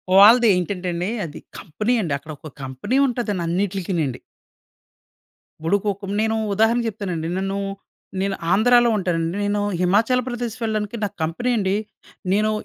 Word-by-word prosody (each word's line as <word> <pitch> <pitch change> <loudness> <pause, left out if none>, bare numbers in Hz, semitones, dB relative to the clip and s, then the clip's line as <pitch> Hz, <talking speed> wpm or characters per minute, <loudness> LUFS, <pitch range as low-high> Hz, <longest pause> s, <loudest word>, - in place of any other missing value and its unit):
వాళ్ళదేంటంటే 200 -4 +5
అండి. 175 +3 -2 0.2
అది 155 -1 -8 0.2
కంపెనీ 210 +8 -1
అండి. 165 -7 -2
అక్కడొక 155 +1 -10
కంపెనీ 135 - -2
ఉంటదని 230 -7 -2
అన్నిట్లకి 190 +1 -1
నండి. 135 -5 -2 1.4
భుడుకోకుం 200 +2 -1
నేను 220 0 +1 0.2
ఉదాహరణ 225 +3 +3
చెప్తానండి. 185 -7 -3
నన్ను 195 +1 -2 0.6
నేను 195 0 0 0.2
ఆంధ్రాలో 240 +4 +5
ఉంటానండి. 170 -2 -1
నేను 205 0 0 0.2
హిమాచల్ 220 +8 +3
ప్రదేశ్ 240 -2 -3
వెళ్ళడానికి 215 -1 -2
నాకు 205 - -3
కంపెనీ 175 +11 -1
అండి, 195 -2 +1 0.6
నేను 215 +2 +2
200 Hz, 125 wpm, -22 LUFS, 175-220 Hz, 1.4 s, వాళ్ళదేంటంటే